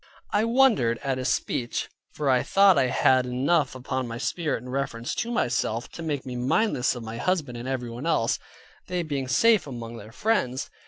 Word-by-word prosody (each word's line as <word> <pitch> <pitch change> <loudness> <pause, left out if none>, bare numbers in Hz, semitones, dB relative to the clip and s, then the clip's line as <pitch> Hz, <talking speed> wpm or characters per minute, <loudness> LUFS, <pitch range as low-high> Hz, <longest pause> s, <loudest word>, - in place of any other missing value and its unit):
I 210 +2 +2
wondered 230 - +3
at 135 -2 -1
his 130 - -2
speech, 120 -1 -1 0.3
for 150 - -3
I 130 -2 +4
thought 195 -1 +5
I 130 - +3
had 130 0 +3
enough 135 +3 +1
upon 130 0 -3
my 115 0 -5
spirit 155 +3 -2
in 125 - -9
reference 125 -3 -3
to 235 - -2
myself, 120 - -1
to - - -9
make 150 -5 -3
me 125 -1 -5
mindless 130 - +1
of 120 - -7
my 110 +1 -6
husband 150 -3 -1
and 120 +2 -6
everyone 125 +2 -4
else; 115 -8 +1 0.5
they 180 -1 -1
being 140 -4 -3
safe 215 - +4
among 120 -3 -7
their 110 0 -11
friends. 130 - -1
130 Hz, 190 wpm, -26 LUFS, 120-165 Hz, 0.5 s, thought